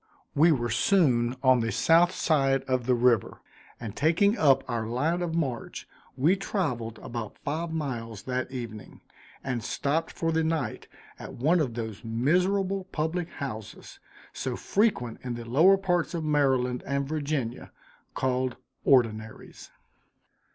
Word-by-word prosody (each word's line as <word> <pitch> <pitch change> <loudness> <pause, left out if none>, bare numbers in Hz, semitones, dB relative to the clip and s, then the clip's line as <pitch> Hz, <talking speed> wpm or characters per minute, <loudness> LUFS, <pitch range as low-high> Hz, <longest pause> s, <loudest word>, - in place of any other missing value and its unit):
We 165 +4 +5
were 120 -6 0
soon 125 - +2
on 130 -1 +5
the 115 0 -1
south 170 +2 +4
side 135 -7 +1
of 130 -2 -1
the 125 - +4
river, 120 -3 +2 0.4
and 110 -3 -7
taking 170 - +3
up 135 - +3
our 115 -3 -2
line 150 +9 0
of 170 -2 -2
march, 135 -8 -3 0.3
we 155 +9 +4
traveled 125 - -3
about 115 -3 -6
five 160 +3 -2
miles 120 -9 -4
that 130 0 -2
evening, 115 -5 -8 0.4
and 125 -4 -3
stopped 155 +4 -1
for 165 -1 -1
the 160 0 +1
night 160 -8 -2 0.3
at - - -8
one 155 +8 +2
of 130 -7 -1
those 110 -2 -5
miserable 185 - +1
public 170 0 -2
houses, 120 -7 -8 0.3
so - - -3
frequent 195 - 0
in 125 -2 -3
the 120 0 -7
lower 160 +12 +5
parts 180 -3 0
of 165 - -2
Maryland 135 -5 +1
and 140 0 -1
Virginia, 145 -5 -3 0.4
called 130 -1 0 0.3
"ordinaries." 115 -4 0
135 Hz, 140 wpm, -27 LUFS, 120-165 Hz, 0.4 s, We